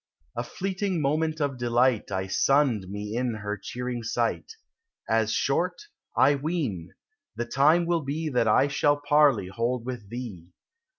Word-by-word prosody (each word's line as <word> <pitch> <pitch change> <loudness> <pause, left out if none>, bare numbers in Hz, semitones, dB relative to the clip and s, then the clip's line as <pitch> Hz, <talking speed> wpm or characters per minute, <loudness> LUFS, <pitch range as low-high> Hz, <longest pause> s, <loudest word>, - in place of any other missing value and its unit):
A - - -2
fleeting 195 -1 -2
moment 155 +2 0
of 140 -4 -1
delight 120 -2 +2
I 95 -1 -1
sunned 120 -1 +2
me 105 +2 -5
in 120 -1 -1
her 105 -1 -4
cheering 125 +4 -5
sight; 115 - -2 0.5
As - - +2
short, - - 0 0.4
I 140 +2 +6
ween, 140 - -3 0.4
the 120 +2 -2
time 150 +8 +3
will 170 -1 +1
be 150 +3 -3
That 125 -6 +1
I 120 +6 +4
shall 145 +1 +2
parley 145 -9 +3
hold 115 +4 -2
with 120 -6 -6
thee. 110 -8 -7
125 Hz, 145 wpm, -26 LUFS, 110-150 Hz, 0.5 s, I